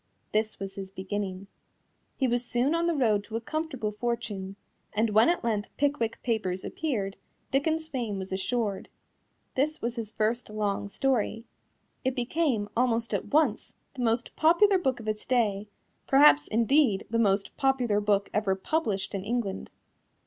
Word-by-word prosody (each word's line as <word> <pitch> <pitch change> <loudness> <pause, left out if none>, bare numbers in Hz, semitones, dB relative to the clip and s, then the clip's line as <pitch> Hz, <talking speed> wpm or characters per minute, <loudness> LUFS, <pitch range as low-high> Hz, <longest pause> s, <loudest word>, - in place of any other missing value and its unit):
This 215 0 0
was 195 -1 -6
his 195 -1 -7
beginning. 190 0 -4 0.7
He 265 - +2
was 245 0 +1
soon 245 +5 +1
on 335 +1 +1
the 340 - +1
road 220 -7 +2
to 220 - -7
a - - +1
comfortable 270 -4 -3
fortune, 210 -4 -3 0.4
and 220 +1 +1
when 220 +6 +5
at 350 - +1
length 215 -3 -1
Pickwick 280 -6 0
Papers 200 -6 -1
appeared, 210 -11 -2 0.3
Dickens's 315 +4 +1
fame 240 -9 -3
was 190 0 -6
assured. 205 +1 -2 0.6
This 305 +4 0
was 235 +1 -3
his 225 -3 -3
first 225 +2 -1
long 205 -1 -1
story. 230 0 0 0.6
It 260 -1 0
became, 245 -4 0
almost 235 -1 +1
at - - -1
once, 290 -8 +1 0.2
the 255 - -5
most 230 0 0
popular 370 +5 +5
book 265 -8 0
of 220 - -9
its 215 0 -2
day, 215 -5 +1 0.4
perhaps, 285 +2 +6
indeed, 230 -2 +3
the 230 - +1
most 200 -2 +1
popular 255 -6 +2
book 205 -1 +2
ever 205 -3 +1
published 205 -3 -1
in 195 -2 -3
England. 215 -3 -2
230 Hz, 155 wpm, -28 LUFS, 205-265 Hz, 0.7 s, perhaps